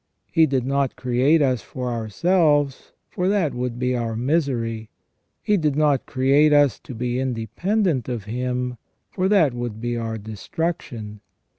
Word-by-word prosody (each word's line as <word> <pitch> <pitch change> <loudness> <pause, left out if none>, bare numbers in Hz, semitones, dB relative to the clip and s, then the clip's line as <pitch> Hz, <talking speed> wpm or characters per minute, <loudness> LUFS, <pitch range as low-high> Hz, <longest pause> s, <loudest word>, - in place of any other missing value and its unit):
He 160 -1 +4
did 130 -3 0
not 140 -1 0
create 130 +5 +2
us 130 -5 +1
for 125 -1 -5
ourselves, 145 - +1 0.2
for 180 - -2
that 190 -7 +1
would 125 -1 -3
be 125 0 0
our 115 -2 -2
misery. 120 -5 -1 0.5
He 210 - +2
did 150 -5 0
not 150 -3 +2
create 140 +4 +3
us 145 -3 +4
to 125 - -10
be 125 +2 -2
independent 130 - -1
of 120 -4 -3
Him, 125 +3 -3 0.3
for 190 0 0
that 170 -11 +4
would 120 -3 -5
be 120 +1 -2
our 115 -1 -3
destruction. 110 - -5
130 Hz, 150 wpm, -23 LUFS, 120-150 Hz, 0.5 s, He